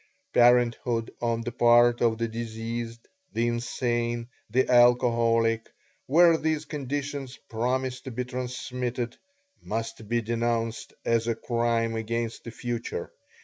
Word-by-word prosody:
Parenthood 120 -1 +3
on 115 -1 0
the 120 +1 -4
part 120 0 +5
of 115 -2 +3
the 115 0 -1
diseased, 115 +1 -5 0.3
the 115 - +1
insane, 120 0 -1 0.2
the 130 +4 +2
alcoholic 115 -2 +4 0.4
where 165 +3 +6
these 155 -1 0
conditions 140 -2 -4
promise 130 +3 -1
to 135 - -7
be 125 +1 -3
transmitted 125 -1 -4 0.4
must 115 -1 -5
be 120 0 +2
denounced 115 0 -1
as 115 0 +2
a 115 - +1
crime 115 -1 0
against 115 +1 -3
the - - -5
future. 120 0 -4
120 Hz, 120 wpm, -27 LUFS, 115-125 Hz, 0.4 s, where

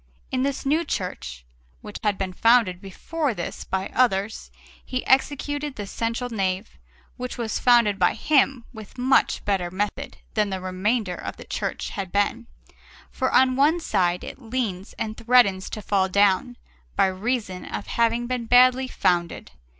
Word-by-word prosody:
In 255 - 0
this 275 +1 -2
new 305 +5 +2
church, 65 - -5 0.4
which - - -8
had 205 -2 0
been 190 -1 -3
founded 225 -4 +3
before 275 - -3
this 170 - -5
by 190 0 -3
others, 220 -4 +1 0.3
he 255 -1 -4
executed 290 +1 +1
the 205 - -5
central 230 +4 -3
nave, 190 -3 -2 0.5
which 250 0 -5
was 230 -3 -2
founded 235 -5 +4
by 180 - +3
him 270 -5 +2
with 220 +1 -11
much 260 +2 +2
better 190 -4 0
method 205 +9 -4 0.2
than 210 -2 +1
the 190 -1 -3
remainder 185 +2 -1
of - - -7
the - - -10
church - - -3
had 195 -4 -5
been; 205 +4 0 0.6
for 260 - -1
on 255 0 +4
one 300 +6 +3
side 180 - 0
it - - -9
leans 220 -6 -3
and 215 0 -4
threatens 230 -5 +3
to 215 - -6
fall 190 -1 +1
down, 200 +5 +2 0.4
by - - +4
reason 190 0 -2
of - - -5
having 235 +1 +1
been 245 -1 -3
badly 255 +2 +5
founded. 175 -8 -1
225 Hz, 160 wpm, -24 LUFS, 190-255 Hz, 0.6 s, badly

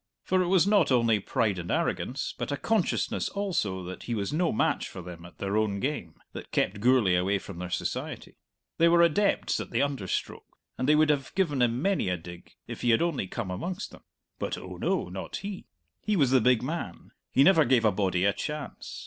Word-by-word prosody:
For 185 0 +2
it 180 - 0
was 185 -2 +4
not 200 -7 +3
only 115 -4 +3
pride 100 -1 0
and 85 - -6
arrogance, 130 +2 -1
but - - -4
a 145 - -1
consciousness 220 +1 0
also 165 - -2
that 90 +1 -7
he 120 - -2
was 100 +4 -2
no 170 +2 +1
match - - 0
for 90 - -9
them 85 -1 -10
at 90 - -18
their 100 +1 -2
own 105 -2 +1
game, 115 - -3 0.2
that - - -9
kept 100 +2 0
Gourlay 120 -4 +4
away 95 +3 +2
from 95 -2 -9
their 90 0 -5
society. 90 - -4 0.4
They 165 - +6
were 170 0 +5
adepts 195 +5 +2
at - - -5
the - - +1
under 140 -9 -2
stroke, - - -4 0.2
and 130 - -1
they 150 - +6
would 155 0 +4
have 135 -2 -3
given 160 -9 +1
him 120 +3 +1
many 195 - +1
a 90 - 0
dig 85 +1 -12
if - - -8
he 120 - +1
had 115 +6 +4
only 155 - -1
come 100 -1 -4
amongst 180 - -4
them. - - -14 0.4
But, - - -2
oh - - -8
no, - - 0
not - - -6
he; 200 -1 -6 0.3
he 210 - 0
was 140 -8 +3
the 130 -2 +5
big 125 0 +3
man; 135 - -5 0.2
he 135 - +5
never 165 -1 +6
gave 120 -3 +3
a 110 - +5
body 95 -2 0
a 100 - +3
chance! 150 -1 -6
125 Hz, 220 wpm, -28 LUFS, 100-165 Hz, 0.4 s, They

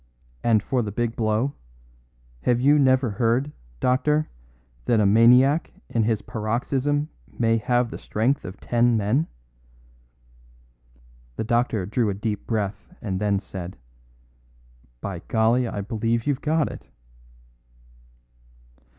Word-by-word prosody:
And 110 -3 +3
for 130 +1 0
the 105 -3 -3
big 120 +2 -2
blow, 110 +5 0 0.9
have 120 - +2
you 145 +4 +5
never 130 -3 +3
heard, 120 +7 +1 0.3
doctor, 150 +5 +1 0.6
that 115 - +3
a 105 - +3
maniac 125 +8 +5 0.2
in 115 - +1
his 110 -1 0
paroxysm 135 +7 -1 0.3
may 115 -1 +2
have 120 +2 +1
the - - -7
strength 125 +7 0
of 95 +1 -8
ten 120 -1 +2
men?" 110 +10 +1 2.1
The - - -2
doctor 115 -3 0
drew 110 +2 0
a 100 - -2
deep 105 0 -4
breath 105 -3 -3
and 95 -3 -3
then 100 -2 +1
said, 95 -4 -8 1.2
"By 95 -4 -4
golly, 115 +3 +2
I 105 - -4
believe 115 +2 -1
you've 145 -3 0
got 155 -1 +1
it." - - -11
115 Hz, 125 wpm, -24 LUFS, 105-130 Hz, 2.1 s, you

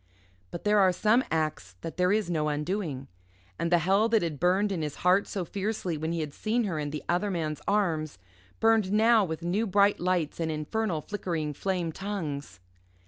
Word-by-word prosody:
But 170 - -7
there 210 0 +4
are 190 -2 +5
some 215 +7 +3
acts 155 - -2
that 165 - -6
there 180 0 +3
is 210 -1 +1
no 155 -3 0
undoing. 150 -2 -3 0.5
And 170 +1 -1
the 175 - +6
hell 195 +6 +2
that 225 -4 +3
had 155 -4 -3
burned 190 +4 +2
in 180 -4 -2
his 150 -2 -3
heart 185 +3 +4
so 190 -3 -3
fiercely 195 -2 -3
when 160 +2 -3
he 170 -1 -1
had 150 -2 -5
seen 230 +7 0
her 180 -7 -2
in 145 -1 -2
the 150 +1 -5
other 180 +4 +1
man's 155 -5 -2
arms 160 - 0 0.4
burned 225 -4 +3
now 220 +1 +5
with 160 -2 -4
new 200 +6 0
bright 200 +1 +3
lights 175 -4 0
and 165 -1 -1
infernal 160 +3 -2
flickering 165 -6 -3
flame 180 +1 -2
tongues. 155 - -5
180 Hz, 195 wpm, -28 LUFS, 155-205 Hz, 0.5 s, the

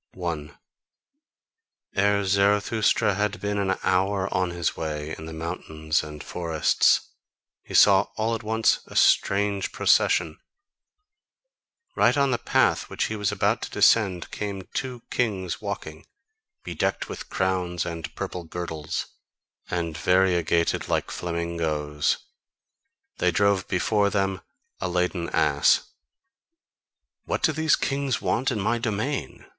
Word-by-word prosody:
1. 85 -5 -5 1.4
Ere 100 +1 +2
Zarathustra 100 +2 +2
had 105 +2 -1
been 105 0 -2
an 95 -1 0
hour 95 +1 +1
on 90 -1 +1
his 85 -1 -2
way 75 -1 -4
in 80 - -9
the - - -7
mountains 80 -1 -2
and 75 -1 -8
forests, 85 -3 +1 0.5
he - - -8
saw 100 -1 +6
all 110 +1 0
at 115 - -3
once 110 0 +2
a - - -12
strange 100 0 +3
procession. 80 -3 +2 1.6
Right - - +3
on 140 -1 +3
the 120 - 0
path - - +1
which - - -2
he 110 - -2
was 105 -1 -1
about 105 +3 +1
to - - -5
descend 100 -4 +3
came 100 -2 -4
two 125 -3 -4
kings 95 -7 -1
walking, 80 0 -6 0.6
bedecked - - -2
with - - -8
crowns 90 -2 -1
and 85 -2 -5
purple 90 - -5
girdles, 80 -2 -4 0.6
and 85 -3 -2
variegated 90 -2 +2
like - - -1
flamingoes: 80 -4 -1 1.0
they - - +3
drove 100 -2 +2
before 100 +2 +1
them 95 -2 -1 0.4
a 90 - -2
laden 90 -1 -1
ass. - - +2 1.3
"What - - -2
do - - +4
these 160 0 +2
kings 135 -2 -1
want 130 +4 0
in 115 -5 -2
my 115 +4 0
domain?" 115 +5 -3
95 Hz, 125 wpm, -25 LUFS, 85-105 Hz, 1.6 s, saw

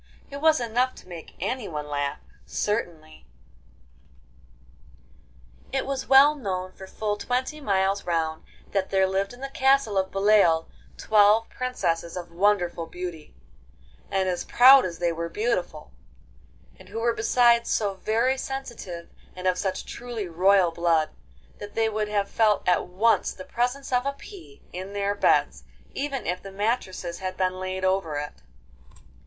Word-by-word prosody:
It 280 - -5
was 315 -2 +4
enough 245 +2 0
to - - -15
make 170 -3 -10
anyone 180 - -3
laugh, 145 -1 -2 0.3
certainly. 165 - -3 2.4
III 270 - -1
It - - -1
was 270 -1 -3
well 275 +2 +7
known 185 -9 -4
for 190 0 -12
full 210 +1 -3
twenty 255 +7 -2
miles 195 -4 +1
round 160 -2 -2 0.3
that 195 -1 -1
there 190 -1 +3
lived 195 +1 -1
in 245 +1 -13
the 275 - -4
castle 265 -6 +2
of 190 0 -1
Beloeil 195 -5 +3 0.3
twelve 215 +1 +4
princesses 170 -9 -2
of 175 -1 -7
wonderful 175 -2 +1
beauty, 175 -3 -8 0.7
and 190 -1 0
as 180 -1 -1
proud 260 +2 +7
as 170 -2 -5
they 175 -1 0
were 170 0 -4
beautiful, 180 -7 -2 0.9
and - - -15
who 220 +3 -5
were 235 +1 +1
besides 235 +1 +3
so 205 -3 0
very 230 +7 0
sensitive 235 -12 -6 0.3
and 185 0 -8
of 185 -1 +2
such 190 -2 -2
truly 235 -5 -6
royal 180 +1 +3
blood, 165 -2 +1 0.5
that 205 0 -9
they 225 0 +2
would 215 -1 -2
have 205 -1 0
felt 215 -1 +1
at 180 - +2
once 210 +6 +1
the 185 - -10
presence 250 +3 -2
of 250 +2 +2
a 280 - -1
pea 395 +7 -13
in 185 +2 -6
their 200 0 0
beds, 205 - +2 0.3
even 275 -3 -3
if 180 +1 -2
the 195 - -10
mattresses 195 -4 -2
had 185 -1 -5
been 185 0 -1
laid 185 0 -3
over 185 -5 0
it. 145 0 -6
200 Hz, 155 wpm, -25 LUFS, 180-240 Hz, 2.4 s, well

